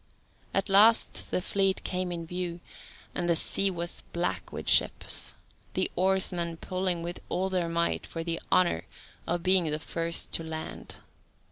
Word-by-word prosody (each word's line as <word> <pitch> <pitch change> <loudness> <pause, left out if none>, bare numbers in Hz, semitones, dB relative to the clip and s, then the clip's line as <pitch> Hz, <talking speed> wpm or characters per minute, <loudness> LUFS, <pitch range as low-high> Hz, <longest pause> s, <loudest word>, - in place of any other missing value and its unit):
At 195 - 0
last 210 +4 +5
the 180 - -1
fleet 195 -1 +1
came 180 -1 -2
in 170 -1 -4
view, 175 0 -4 0.5
and 175 0 -1
the 170 - +4
sea 195 +4 +3
was 170 -2 -2
black 135 - -2
with - - -6
ships, - - +3 0.4
the - - +1
oarsmen 180 -2 +2
pulling 185 -1 -2
with 175 +1 -5
all 190 +1 0
their 180 -2 0
might 170 0 0
for 165 - -5
the 165 0 -3
honour 180 - +3 0.4
of 175 0 -1
being 185 -2 +3
the 150 - -1
first 165 +1 -2
to 165 - -1
land. 160 0 -4
175 Hz, 155 wpm, -28 LUFS, 170-185 Hz, 0.5 s, last